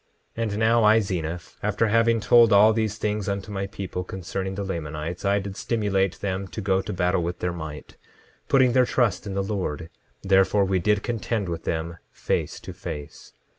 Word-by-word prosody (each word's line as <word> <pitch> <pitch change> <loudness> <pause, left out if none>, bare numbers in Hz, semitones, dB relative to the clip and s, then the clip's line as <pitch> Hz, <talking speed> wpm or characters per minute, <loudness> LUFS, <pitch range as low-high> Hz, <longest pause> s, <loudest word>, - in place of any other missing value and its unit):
10:19 115 - -4
And 105 -2 -2
now 115 +1 +3
I, 110 +1 +6
Zeniff, 85 -4 -4
after 105 +2 +1
having 115 +1 +3
told 115 +2 +5
all 105 +2 +7
these 110 -1 -1
things 105 -2 -2
unto 100 +1 -4
my 100 -1 -3
people 95 -2 -5
concerning 95 +1 -5
the 100 - -3
Lamanites, 80 -2 -5
I 100 +1 +3
did 100 -1 -4
stimulate 100 -5 0
them 95 0 -2
to - - -7
go 95 -1 +1
to 105 - -6
battle 90 -1 +1
with 85 +1 -3
their 90 -1 -2
might, 80 -3 -8 0.5
putting 130 -2 +4
their 125 -1 +4
trust 115 -4 +1
in 95 - -4
the 100 - 0
Lord; 90 -6 -3 0.3
therefore, 95 +1 +4
we 95 -1 +1
did 105 +2 +1
contend 115 -4 -2
with 85 -1 -5
them, 85 +1 -3
face - - -2
to - - -8
face. 75 -1 -8
100 Hz, 190 wpm, -25 LUFS, 90-105 Hz, 0.5 s, all